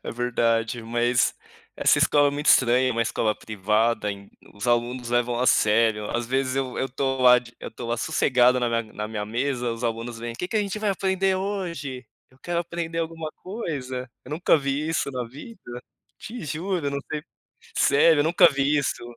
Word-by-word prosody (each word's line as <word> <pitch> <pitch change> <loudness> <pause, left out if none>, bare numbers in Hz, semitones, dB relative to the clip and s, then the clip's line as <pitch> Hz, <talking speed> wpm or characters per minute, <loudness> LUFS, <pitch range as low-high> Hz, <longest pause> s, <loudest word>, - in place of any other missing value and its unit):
É - - -5
verdade. 115 -1 0
Mas 120 +2 +1 0.4
essa - - +4
escola 145 -1 +4
é - - -1
muito 145 +2 -4
estranha. 125 -1 +5
É - - 0
uma 115 0 +1
escola 110 -1 0
privada. 110 +2 0
En 100 0 -9 0.2
os 100 +4 -6
alunos 120 0 0
levam 120 0 +1
a 125 - +1
sério. 110 -1 +3
Às 120 0 -2
vezes, 130 +1 -1
eu 130 -2 -2
eu 135 - -1
tô 135 +1 -2
lá 125 -1 +7
de 120 -1 -13
eu - - -6
estou 115 +1 -8
lá 120 - 0
sossegado 125 -2 +3
na 120 -1 0
minha 115 -2 -2
na 105 0 -5
minha 105 -1 -4
mesa, 125 +2 -1
os 115 +1 -5
alunos 115 0 -3
vêm: 115 0 -5
“Que 180 +9 -4
que 220 - -2
a - - +3
gente 200 +1 -4
vai 210 -1 0
aprender 190 0 +1
hoje? 170 - -4 0.2
Eu 130 - -25
quero 170 +2 -2
aprender 170 -1 -4
alguma 165 -1 -4
coisa”. 130 - -5
Eu - - -12
nunca 165 +3 +3
vi 140 +2 -2
isso 155 -3 -1
na 125 -2 -3
vida, 130 - -10 0.4
te 235 -4 -8
juro. 160 0 -2
Não 140 - -2
sei 150 -1 -3 0.6
Sério. 150 +2 +5
Eu - - +4
nunca 165 +3 +6
vi 140 +2 +1
isso. 140 -3 -2
130 Hz, 200 wpm, -24 LUFS, 120-155 Hz, 0.6 s, lá